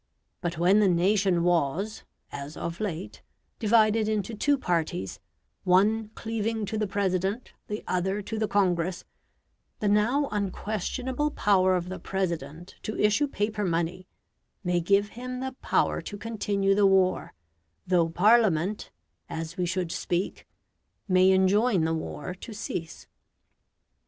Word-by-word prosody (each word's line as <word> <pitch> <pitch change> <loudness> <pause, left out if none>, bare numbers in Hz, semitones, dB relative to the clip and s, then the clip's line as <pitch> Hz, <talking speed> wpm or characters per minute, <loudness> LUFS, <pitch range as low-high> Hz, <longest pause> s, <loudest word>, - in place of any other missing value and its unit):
But 170 -2 -3
when 180 +5 +4
the 210 - +4
nation 185 0 +2
was 175 +5 0 0.3
(as 140 +2 -7
of 170 +1 -4
late) 190 -4 -4 0.4
divided 220 -1 +3
into 215 +1 -1
two 285 +7 +2
parties, 160 - -2 0.4
one 210 +4 +3
cleaving 225 -1 -2
to 215 +2 -3
the 215 - 0
President, 195 +3 -1
the 210 +1 -4
other 190 +3 -1
to 220 +2 -4
the 215 - +1
Congress, 180 -3 0 0.7
the 210 - 0
now 230 +8 +3
unquestionable 220 +7 -2
power 185 -8 +3
of 180 -1 -2
the 185 - -5
President 170 -3 -4
to 215 - -5
issue 210 +8 +3
paper 210 -4 -2
money 175 +1 -1 0.6
may 175 -1 +1
give 200 +4 +2
him 250 +2 -6
the 265 0 -3
power - - +1
to 205 - -7
continue 205 -2 0
the 200 0 +4
war 190 - +2 0.5
though 175 -3 +2
Parliament 205 0 +3 0.4
(as 165 +1 -5
we 180 -2 -1
should 180 -2 -2
speak) 175 +2 -2 0.6
may 185 -1 +5
enjoin 190 +1 +3
the 160 - 0
war 160 +1 -4
to 215 +4 -10
cease. 175 -6 -5
195 Hz, 135 wpm, -27 LUFS, 175-215 Hz, 0.7 s, may